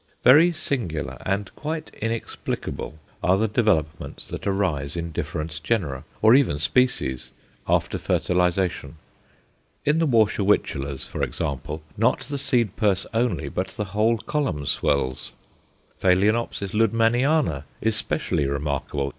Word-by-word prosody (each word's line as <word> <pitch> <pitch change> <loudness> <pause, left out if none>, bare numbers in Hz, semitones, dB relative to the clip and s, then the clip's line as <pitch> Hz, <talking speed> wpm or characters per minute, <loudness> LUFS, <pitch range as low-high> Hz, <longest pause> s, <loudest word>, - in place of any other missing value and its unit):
Very 155 +7 +7
singular 115 - -3
and 100 +1 -1
quite 155 +1 -5
inexplicable 115 -7 -4 0.2
are 90 +2 +3
the 110 +2 +2
developments 95 -8 0
that - - -5
arise 90 -8 0
in 85 -1 -3
different 75 0 -4
genera, 75 - -1 0.2
or 110 +1 +8
even 130 - +4
species, 80 - +1 0.4
after - - +1
fertilization. 90 -4 0 0.9
In 150 +3 +3
the 165 - +2
Warscewiczellas, 100 - +1
for - - -5
example, 75 +3 -3
not 115 +5 +2
the 140 +2 -4
seed 120 -6 +1
purse 100 -3 +2
only, 115 -6 0
but 95 +1 -2
the 105 - -4
whole 110 +2 +3
column 120 - -2
swells. 65 -2 0 0.7
Phaloenopsis 100 +2 +2
Luddemanniana 115 - +2
is 110 0 0
specially 70 - -1
remarkable. 70 0 -2
100 Hz, 120 wpm, -24 LUFS, 75-115 Hz, 0.9 s, or